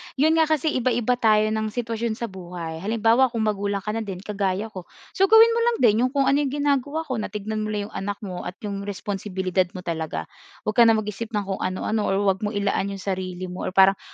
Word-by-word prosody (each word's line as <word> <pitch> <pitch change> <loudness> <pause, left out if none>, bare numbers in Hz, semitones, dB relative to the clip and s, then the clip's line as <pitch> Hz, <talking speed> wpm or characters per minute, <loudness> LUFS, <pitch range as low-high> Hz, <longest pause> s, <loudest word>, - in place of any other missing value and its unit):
'yon 315 +4 +3
nga 320 - +4
kasi 310 0 +1
iba-iba 245 -1 +1
tayo 215 -1 +3
ng 220 0 -1
sitwasyon 230 0 -2
sa 235 -2 -5
buhay. 175 -3 -7
Halimbawa, 225 +6 +3
kung 230 -2 -2
magulang 200 -2 -1
ka 210 - -2
na 225 - -2
din 195 -4 -6
kagaya 205 +1 -2
ko, 185 -4 -9 0.2
so 390 - +3
gawin 445 +2 +8
mo 460 - +1
lang 475 -1 +2
din 220 -2 +5
'yong 250 +1 +2
kung 275 - +4
ano 275 +1 +3
'yong 290 - +1 0.2
ginagawa 285 +2 0
ko 260 -7 -3
na - - -2
tignan 215 +1 -4
mo 215 - -2
lang 205 -1 -2
'yong - - -20
anak 200 +1 -3
mo 185 -3 -5
at 180 - -6
'yong 200 -1 -4
responsibilidad 190 -2 -2
mo 180 - -6
talaga. 160 - -3 0.4
'Wag 215 +3 -1
ka 235 - +8
nang 225 - +6
mag-isip 210 +2 -5
ng 205 - 0
kung 195 -1 -4
ano-ano 205 +3 -1
or 195 - +1
huwag 190 -1 +2
mong 210 0 -3
ilaan 200 -1 0
'yong 195 -1 -6
sarili 185 -2 -3
mo, 180 - -4
or 185 - -5
parang 195 0 +6
210 Hz, 240 wpm, -24 LUFS, 190-235 Hz, 0.4 s, gawin